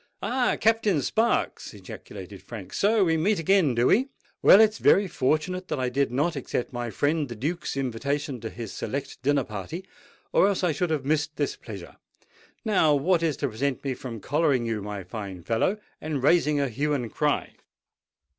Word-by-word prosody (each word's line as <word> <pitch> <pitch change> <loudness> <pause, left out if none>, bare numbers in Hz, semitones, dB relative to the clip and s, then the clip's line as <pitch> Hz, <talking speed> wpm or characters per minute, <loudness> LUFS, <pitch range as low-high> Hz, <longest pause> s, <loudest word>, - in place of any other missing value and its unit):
"Ah! 250 0 +1
Captain 220 -6 +3
Sparks!" 225 - 0
ejaculated - - -10
Frank: - - -9
"so 210 +1 +3
we 165 -3 +2
meet 200 +6 +2
again, 165 -5 +3
do 120 +1 +2
we? 245 - +4 0.3
Well, 195 - +8
it's 220 0 +4
very 200 +1 +5
fortunate 165 +6 -1
that - - -2
I 125 -1 0
did 135 0 0
not 150 +6 0
accept 130 -2 -3
my 120 -1 -3
friend 145 +6 0
the 120 - -6
Duke's 150 +5 -3
invitation 135 +1 -2
to 110 - -4
his 115 -3 -7
select 140 +1 -5
dinner 140 0 +2
party; 105 - -6 0.5
or - - +5
else 200 -2 0
I 175 - +3
should 170 +4 -1
have 150 -4 -1
missed 150 +1 0
this 145 - -1
pleasure. 100 -6 -10 0.7
Now 165 -9 +4
what 165 +5 +2
is 160 -5 0
to - - -1
prevent 130 +4 -2
me 135 -2 -1
from 120 -4 -7
collaring 145 -3 +1
you, 110 -2 -2
my 100 -1 -5
fine 95 -2 -7
fellow, 115 - +1 0.2
and 150 -4 -3
raising 150 -1 +3
a 140 - +1
hue 145 +5 -1
and 120 -5 -4
cry?" - - 0
145 Hz, 185 wpm, -26 LUFS, 120-175 Hz, 0.7 s, Well